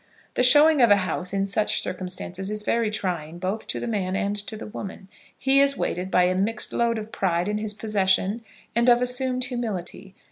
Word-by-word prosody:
The -, -, +1 dB
showing 295 Hz, +3 st, +6 dB
of 235 Hz, -, +6 dB
a 205 Hz, -, +7 dB
house 185 Hz, 0 st, -3 dB
in 195 Hz, 0 st, 0 dB
such 205 Hz, +2 st, 0 dB
circumstances 185 Hz, +1 st, -4 dB
is 210 Hz, 0 st, -2 dB
very 230 Hz, 0 st, +1 dB
trying, 175 Hz, -6 st, -4 dB
both 190 Hz, +5 st, -4 dB
to -, -, -3 dB
the -, -, -4 dB
man 195 Hz, -5 st, -2 dB
and 205 Hz, 0 st, -1 dB
to 220 Hz, -, -6 dB
the -, -, -8 dB
woman. 200 Hz, -2 st, -8 dB, 0.3 s
He 270 Hz, +1 st, +3 dB
is 280 Hz, 0 st, +3 dB
weighted 180 Hz, +2 st, -2 dB
by 180 Hz, -, +3 dB
a 180 Hz, +1 st, +2 dB
mixed 215 Hz, +4 st, 0 dB
load 235 Hz, -1 st, +1 dB
of 220 Hz, 0 st, -7 dB
pride 175 Hz, -1 st, 0 dB
in 210 Hz, 0 st, -1 dB
his 210 Hz, -1 st, -4 dB
possession 205 Hz, 0 st, +1 dB, 0.3 s
and 235 Hz, +1 st, +4 dB
of 240 Hz, 0 st, +6 dB
assumed 255 Hz, 0 st, 0 dB
humility. 200 Hz, -6 st, -5 dB
210 Hz, 205 wpm, -24 LUFS, 190-235 Hz, 0.3 s, a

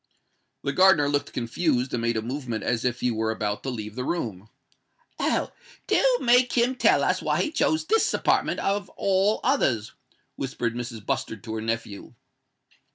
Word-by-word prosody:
The 140 Hz, -, -1 dB
gardener 185 Hz, -4 st, +5 dB
looked 145 Hz, 0 st, -1 dB
confused, 125 Hz, +1 st, -1 dB
and 120 Hz, -, -1 dB
made 115 Hz, -1 st, 0 dB
a 110 Hz, -, -2 dB
movement 120 Hz, -3 st, -4 dB
as 115 Hz, 0 st, -1 dB
if 125 Hz, -1 st, -1 dB
he 125 Hz, -, +1 dB
were 110 Hz, 0 st, -1 dB
about 105 Hz, -2 st, -2 dB
to 135 Hz, -, -4 dB
leave 110 Hz, -4 st, -5 dB
the 125 Hz, -, -4 dB
room. 110 Hz, -, -4 dB, 0.7 s
"Oh! -, -, 0 dB, 0.3 s
do -, -, +2 dB, 0.2 s
make 245 Hz, 0 st, +4 dB
him 245 Hz, +1 st, +2 dB
tell 260 Hz, -, +3 dB
us -, -, +1 dB
why -, -, +1 dB
he 305 Hz, -, -3 dB
chose 315 Hz, 0 st, +1 dB
this 445 Hz, +6 st, +2 dB
apartment -, -, +1 dB
of 200 Hz, 0 st, -1 dB
all 195 Hz, +2 st, +2 dB
others!" 120 Hz, -, +1 dB, 0.4 s
whispered 125 Hz, -3 st, -2 dB
Mrs. 120 Hz, -3 st, -6 dB
Bustard 110 Hz, -3 st, -3 dB
to 110 Hz, -, -6 dB
her 110 Hz, -, -3 dB
nephew. 115 Hz, -2 st, -4 dB
125 Hz, 170 wpm, -25 LUFS, -, 0.7 s, gardener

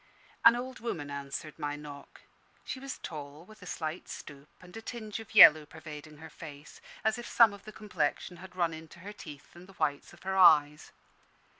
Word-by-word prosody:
An 235 Hz, -, +8 dB
old 255 Hz, +1 st, -6 dB
woman 160 Hz, -11 st, -5 dB
answered 140 Hz, +2 st, -6 dB
my 145 Hz, -1 st, -3 dB
knock. 145 Hz, -1 st, -11 dB, 0.4 s
She 260 Hz, -, -5 dB
was 275 Hz, 0 st, -6 dB
tall, 150 Hz, 0 st, -9 dB
with 215 Hz, +1 st, -17 dB
a 180 Hz, -, -11 dB
slight 160 Hz, 0 st, -5 dB
stoop, 140 Hz, +1 st, -10 dB
and 180 Hz, -1 st, -15 dB
a 225 Hz, -, -7 dB
tinge 220 Hz, -2 st, -6 dB
of 220 Hz, 0 st, -12 dB
yellow 155 Hz, -7 st, +10 dB
pervading 155 Hz, -1 st, -11 dB
her 160 Hz, +1 st, -11 dB
face, 145 Hz, -2 st, -12 dB, 0.2 s
as 220 Hz, +2 st, +1 dB
if 240 Hz, -, -7 dB
some 225 Hz, -3 st, +5 dB
of 200 Hz, -1 st, -13 dB
the 215 Hz, -, -9 dB
complexion 180 Hz, -4 st, -3 dB
had 180 Hz, +1 st, -13 dB
run 170 Hz, -3 st, 0 dB
into 160 Hz, +2 st, -11 dB
her 205 Hz, +3 st, -8 dB
teeth 150 Hz, -8 st, -12 dB
and 175 Hz, +1 st, -13 dB
the 195 Hz, -, -15 dB
whites 145 Hz, -6 st, -2 dB
of -, -, -17 dB
her 190 Hz, 0 st, -2 dB
eyes. 150 Hz, -5 st, +5 dB
165 Hz, 195 wpm, -30 LUFS, 150-210 Hz, 0.4 s, yellow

